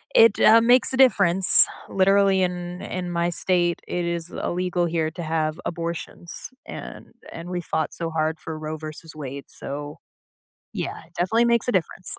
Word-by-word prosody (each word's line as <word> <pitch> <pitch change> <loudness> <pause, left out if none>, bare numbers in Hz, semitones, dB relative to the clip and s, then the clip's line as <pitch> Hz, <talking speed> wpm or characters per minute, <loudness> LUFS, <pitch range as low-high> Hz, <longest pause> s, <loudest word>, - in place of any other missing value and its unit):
it, 225 -2 +6
uh, 225 +1 +6
makes 245 +3 +5
a - - -1
difference. 195 -8 +6 0.2
Literally, 195 0 +3
in 180 0 -4
in 180 -1 -5
my 170 0 0
state, 175 0 0
it 175 -1 -2
is 170 -1 -3
illegal 180 0 -2
here 165 -2 -1
to 170 +1 -7
have 155 -1 -2
abortions, 170 0 -6 0.2
and - - -10 0.2
and 165 +1 -8
we 180 -1 -3
fought 160 -1 -3
so 165 -1 -4
hard 160 0 -1
for 160 -1 -7
Roe 155 0 -5
v. 155 0 -8 0.3
Wade, 140 -2 -7
so 145 +1 -7 0.7
Yeah, - - -5 0.2
definitely 225 +7 +2
makes 235 -1 +1
a - - +2
difference. 185 -1 -2
175 Hz, 165 wpm, -23 LUFS, 160-190 Hz, 0.7 s, it